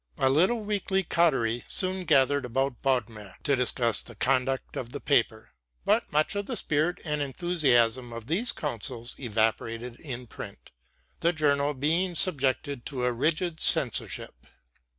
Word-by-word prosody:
A 130 - +3
little 185 - +3
weekly 200 -2 -1
coterie 135 -10 +1
soon 185 -1 +2
gathered 140 -2 +3
about 130 +1 -2
Bodmer 115 -7 -1
to 140 - +2
discuss 120 -2 +2
the 120 - -11
conduct 130 +3 0
of 120 0 -6
the 145 - -4
paper; 115 - 0 0.3
but - - +1
much 155 +7 +1
of 200 0 -3
the 250 - -1
spirit 155 +1 0
and 150 -1 -1
enthusiasm 130 -6 +1
of 115 -1 -8
these 195 - +1
councils 120 -3 -4
evaporated 115 0 -2
in 125 -4 -6
print, - - -10 0.5
the 170 - +2
journal 145 -2 +1
being 165 +7 0
subjected 140 -6 0
to 130 -4 -3
a 125 - +1
rigid 160 +6 0
censorship. - - +1
135 Hz, 145 wpm, -27 LUFS, 120-160 Hz, 0.5 s, A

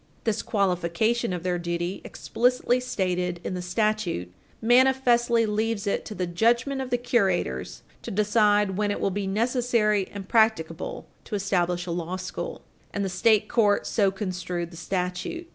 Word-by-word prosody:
This 225 -3 0
qualification 200 +4 0
of 175 -2 -4
their 180 -1 0
duty, 175 +2 -3
explicitly 250 +1 +1
stated 180 -7 -1
in - - -3
the 180 - -3
statute, 180 - -1 0.3
manifestly 240 -1 +4
leaves 215 0 -1
it 200 - -1
to 210 - -7
the 185 - -1
judgment 235 +9 +1
of 260 - -5
the 245 - +1
curators 195 - 0 0.2
to - - -7
decide 210 -1 +2
when 210 0 +1
it 205 - -2
will 195 - 0
be 200 +1 -2
necessary 220 -2 +1
and 195 -2 -7
practicable 220 -8 +1 0.2
to - - -4
establish 180 -3 0
a 175 - -4
law 175 +1 -3
school, 185 0 -6 0.3
and 200 -1 -2
the - - -2
state 210 +3 +3
court 210 -4 +2
so 200 -3 +2
construed 180 -3 -4
the - - -12
statute. 180 - -3
205 Hz, 160 wpm, -26 LUFS, 180-230 Hz, 0.3 s, manifestly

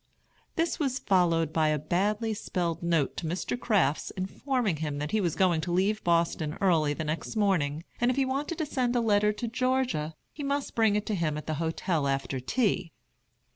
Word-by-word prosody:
This 330 +1 0
was 270 -4 0
followed 170 - +2
by 160 -1 +3
a 155 0 +2
badly 205 +9 0
spelled 175 -5 -2
note 165 -5 +1
to 165 - -3
Mr. 180 +8 -2
Crafts, 205 - +1
informing 205 - -1
him 150 -2 -3
that 150 +1 -3
he 215 - +2
was 170 -4 0
going 175 -4 +3
to 175 +2 -3
leave 195 +5 +1
Boston 170 -2 +1
early 160 -6 +3
the 160 - -3
next 155 +8 -3
morning, 165 -8 +1 0.2
and 240 - +3
if 255 - 0
he 270 - +3
wanted 280 +5 -2
to 315 - -1
send 250 -4 0
a - - +4
letter 210 -2 +3
to 210 +3 -4
Georgia 255 -10 0 0.2
he 300 - -8
must 280 0 -2
bring 220 -3 +3
it 210 - 0
to 215 - -2
him 160 -5 0
at 150 - -6
the 155 - -2
hotel 160 -2 0
after 135 -1 -1
tea. 185 - 0
185 Hz, 200 wpm, -28 LUFS, 160-235 Hz, 0.2 s, a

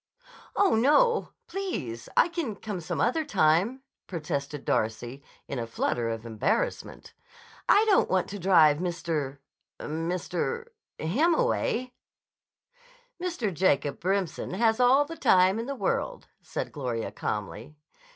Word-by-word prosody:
"Oh, 400 -2 +4
no! 300 - +4 0.2
Please! 185 - -4
I - - +6
can 330 -11 -3
come 200 -3 -5
some 160 - -4
other 285 +7 +2
time," 200 - +2 0.2
protested 150 -4 -4
Darcy 120 +5 -1 0.3
in 135 - -4
a 115 - -3
flutter 115 0 -1
of 115 0 -4
embarrassment. 115 - -2 0.6
"I 420 +2 +6
don't 415 -3 +4
want 185 -1 +1
to 205 - -6
drive 165 -5 +5
Mr.—Mr.— 170 - -4 0.3
him 280 - +2
away." 255 - 0 1.3
"Mr. 330 - -2
Jacob 155 -5 +1
Remsen 190 -1 -1
has 225 +2 +2
all 260 +4 +5
the 330 +3 -8
time 185 +3 +4
in 230 - -4
the 280 - -3
world," 265 - -2 0.2
said - - -5
Gloria 125 -6 -3
calmly. 105 +7 -5
185 Hz, 120 wpm, -27 LUFS, -, 1.3 s, I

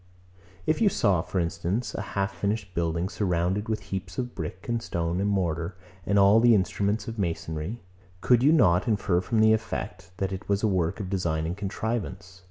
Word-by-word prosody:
If 155 +7 +1
you 215 - +6
saw, 100 - +2
for 95 +1 -3
instance, 90 +7 -2
a - - -3 0.2
half 100 0 0
finished 100 +1 -2
building, 85 +1 0
surrounded 95 +2 -1
with 110 -1 -1
heaps 95 -1 -4
of 125 -1 -3
brick 90 +2 -6
and 115 -1 -1
stone 85 -2 -2
and 100 - +1
mortar, 85 -2 -1 0.3
and 100 - +2
all 100 +2 +6
the 120 0 +6
instruments 100 +4 0
of 115 -1 -5
masonry; 85 +3 -3 0.4
could 120 +4 +4
you 140 +4 +5
not 95 - +4
infer 100 -5 +1
from 110 +3 +1
the 110 0 +6
effect, 95 -4 -4
that 95 0 -2
it 95 +2 -7
was 100 +1 +1
a - - +4
work 90 -2 0
of 95 -3 -5
design 85 -5 0
and 85 +2 -2
contrivance? 95 -2 -4
95 Hz, 190 wpm, -27 LUFS, 90-110 Hz, 0.4 s, you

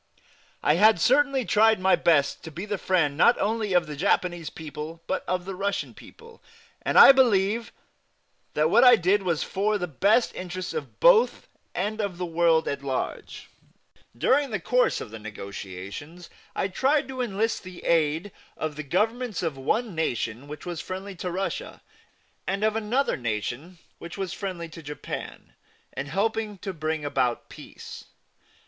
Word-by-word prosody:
I 150 - +3
had 215 0 +6
certainly 275 - +3
tried 220 0 +4
my 190 +1 +4
best 145 -5 +2
to - - -6
be 175 +6 -6
the 205 -2 -3
friend 165 -7 +1
not 235 +10 +5
only 215 -1 -1
of 175 -1 +3
the 150 -1 -7
Japanese 175 0 0
people 155 +1 -8
but - - -2
of 180 0 -1
the 195 - -5
Russian 200 +2 -2
people, 460 0 -15 0.4
and - - 0
I - - +11
believe 230 -4 +2 0.8
that 155 +2 +2
what 235 +3 +6
I 250 -1 +9
did 195 +1 +2
was 170 -5 0
for 210 +2 0
the 180 - -2
best 200 - +2
interests 185 0 -5
of 465 - -6
both - - +4 0.3
and 210 +4 -2
of 200 -4 -3
the 180 - -3
world 165 -1 +2
at 140 0 -2
large. 135 -2 -4 0.7
During 275 - +2
the 215 -4 -2
course 250 +9 +1
of - - -8
the 110 - -8
negotiations 105 - -8 0.2
I - - 0
tried 270 +9 +1
to 260 -1 -4
enlist 225 -1 -1
the 185 -1 -11
aid 165 +3 +1 0.3
of 155 -2 -4
the - - -3
Governments 215 - -1
of 160 -4 -1
one 215 - -1
nation 125 -5 -2
which 150 0 -9
was 175 -2 -4
friendly 190 +2 -6
to 180 - -4
Russia, 190 +3 -4 0.6
and 195 +2 -1
of 215 0 +2
another 225 +5 0
nation 120 - -4 0.2
which 170 +3 -9
was 190 -3 -3
friendly 185 -4 -5
to 165 - -11
Japan, 150 -1 -7 0.4
in 140 - -4
helping 215 +5 -1
bring 160 -5 -4
about 125 -4 -1
peace. - - -11
185 Hz, 165 wpm, -26 LUFS, 155-215 Hz, 0.8 s, I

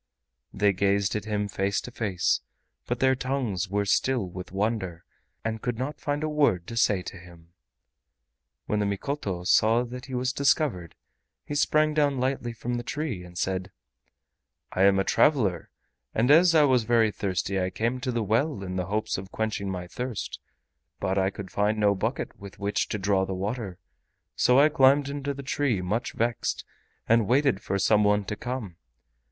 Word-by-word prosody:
They 100 0 +2
gazed 100 +1 +1
at 105 - -3
him 105 -1 -1
face 100 0 -1
to 125 - -9
face, 100 -7 0 0.5
but - - -2
their 130 0 +5
tongues 125 -8 -2
were 100 +1 0
still 120 +1 +1
with 90 0 -8
wonder 95 -4 -2 0.4
and 110 -1 -2
could 120 -2 -2
not 130 +5 -4
find 145 0 -2
a - - 0
word 140 - +2
to 115 - -6
say 105 -5 +2
to 100 - -8
him. 85 -1 -16 1.1
When 105 - 0
the 105 - +1
Mikoto 100 -3 -3
saw 110 +6 +4
that 125 +2 -8
he 130 - -5
was 125 +1 0
discovered, 130 - +1 0.5
he - - -5
sprang 155 +1 +2
down 145 -3 +2
lightly 130 -2 -1
from 120 +2 -4
the 120 - -4
tree 135 - -3
and 90 0 -12
said: 95 0 -2 1.0
"I 95 - +3
am 100 0 +5
a 95 - +2
traveler, 105 - +2 0.5
and 120 +5 +3
as 165 +2 +6
I 155 - +7
was 130 -4 +4
very 115 -1 +3
thirsty 95 -1 -2
I 90 - 0
came 115 +6 -1
to 125 0 -2
the 115 -2 -1
well 115 +3 0
in 95 -1 -4
the 90 -1 -2
hopes 105 0 -1
of 95 0 -10
quenching 110 -3 -2
my 90 -2 -4
thirst, 125 +5 -5 0.6
but 95 +1 0
I 95 0 +2
could 100 -1 -8
find 105 +1 +1
no 105 -1 +3
bucket 95 - -3
with 100 -1 -10
which 100 0 -1
to - - -2
draw 95 -1 +1
the 95 0 -3
water. 100 -1 -4 0.6
So 125 +2 +4
I 145 - +7
climbed 140 -1 +4
into 140 0 -3
the 140 - -7
tree, 130 -5 0
much 105 +7 -2
vexed, 115 +1 -1 0.4
and 115 -2 +4
waited 135 -4 +2
for 100 - -2
some 105 +2 +3
one 105 0 +2
to 105 - -3
come. 115 -8 -5
110 Hz, 185 wpm, -27 LUFS, 95-130 Hz, 1.1 s, I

